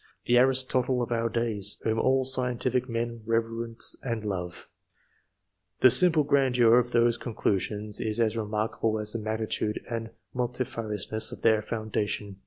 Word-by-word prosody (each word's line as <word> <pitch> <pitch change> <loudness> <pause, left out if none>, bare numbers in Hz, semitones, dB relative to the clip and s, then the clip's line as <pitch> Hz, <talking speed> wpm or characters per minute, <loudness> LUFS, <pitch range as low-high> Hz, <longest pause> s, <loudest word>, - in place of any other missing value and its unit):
"the 120 - +2
Aristotle 130 -1 +2
of 120 - -6
our 115 0 0
days," 110 -3 0
whom 110 0 0
all 130 +2 +2
scientific 125 0 0
men 115 0 -3
reverence 115 +1 +1
and 115 -4 -4
love; 90 -4 -5 1.1
the 130 - +7
simple 160 +4 +6
grandeur 125 -4 +4
of 120 0 -2
whose 120 0 +2
conclusions 105 -2 -2
is 110 0 -2
as 115 -1 +1
remarkable 110 0 -2
as 105 0 -4
the 115 - -3
magnitude 110 0 -2
and 115 -1 -4 0.2
multifariousness 115 -4 -2
of - - -10
their 110 -2 +4
foundation. 105 -2 -3
115 Hz, 140 wpm, -27 LUFS, 110-125 Hz, 1.1 s, the